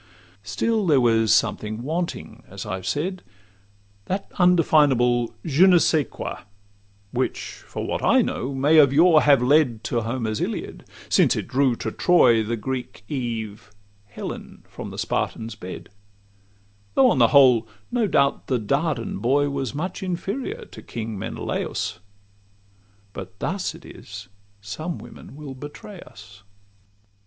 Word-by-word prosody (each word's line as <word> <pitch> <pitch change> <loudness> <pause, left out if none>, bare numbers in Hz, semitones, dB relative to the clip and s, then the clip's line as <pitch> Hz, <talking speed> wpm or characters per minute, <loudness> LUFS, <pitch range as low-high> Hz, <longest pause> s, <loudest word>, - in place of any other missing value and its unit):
Still 190 - -1
there 145 -4 +5
was 115 -3 +3
something 110 +2 +1
wanting, 170 +5 -4
as 100 +1 -8
I've 95 -3 -5
said— 180 - -2 0.8
That 190 - -4
undefinable 140 -9 +3
'Je 165 +5 +5
ne 180 -2 +7
scais 155 -3 +2
quoi,' - - -6 0.7
Which, - - -3
for - - -5
what - - -2
I - - +5
know, 135 +2 -3
may 145 +4 +5
of 140 -3 +6
yore 160 +2 +6
have 140 -4 +5
led 125 -4 +3
To 120 - -1
Homer's 115 -2 -2
Iliad, - - -4 0.2
since - - +3
it - - -4
drew 130 -1 +2
to - - -4
Troy 125 -11 +4
The 115 +2 -2
Greek 125 -3 -5
Eve, 115 -6 -4 0.4
Helen, 100 - -8
from - - -8
the - - -9
Spartan's 115 0 -2
bed; 95 -4 -9 1.1
Though 135 - +6
on 130 - +1
the 115 - +7
whole, 125 -4 +5 0.2
no 240 -3 +1
doubt, 140 -6 +1
the 130 - +1
Dardan 140 +2 -1
boy 140 +4 +2
Was 135 -2 -3
much 175 +6 -4
inferior 235 - -4
to - - -12
King 110 -3 -6
Menelaus:— - - -3 1.1
But 95 0 -9
thus 190 - -3
it - - -14
is - - -10 0.3
some 155 - -5
women - - -12
will 145 -2 -8
betray 145 +8 -10
us. 100 - -14
135 Hz, 140 wpm, -23 LUFS, 115-160 Hz, 1.1 s, ne